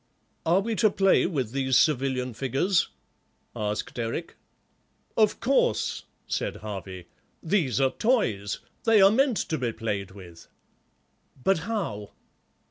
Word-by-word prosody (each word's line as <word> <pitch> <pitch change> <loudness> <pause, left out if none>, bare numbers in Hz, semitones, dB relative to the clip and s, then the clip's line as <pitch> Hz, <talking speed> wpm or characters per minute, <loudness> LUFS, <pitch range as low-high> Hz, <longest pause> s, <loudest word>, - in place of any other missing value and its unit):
"Are 175 +4 +4
we 225 +3 -2
to 220 - +4
play 195 -2 +3
with 135 - -2
these 130 -1 +2
civilian 130 -4 +1
figures?" 135 - +1 0.7
asked 105 +3 -3
Eric. 115 +9 -4 0.8
"Of 215 -2 +3
course," 255 - +1 0.2
said - - -2
Harvey, 95 -4 -7 0.4
"these 160 -8 +1
are 135 -1 +3
toys; 115 - 0 0.2
they 225 -2 +5
are 195 0 +7
meant 255 0 +2
to 160 -4 -2
be 120 -2 -1
played 100 -4 -3
with." 90 -4 -13 1.0
"But 195 -3 +3
how?" 165 - -4
135 Hz, 125 wpm, -26 LUFS, -, 1.0 s, are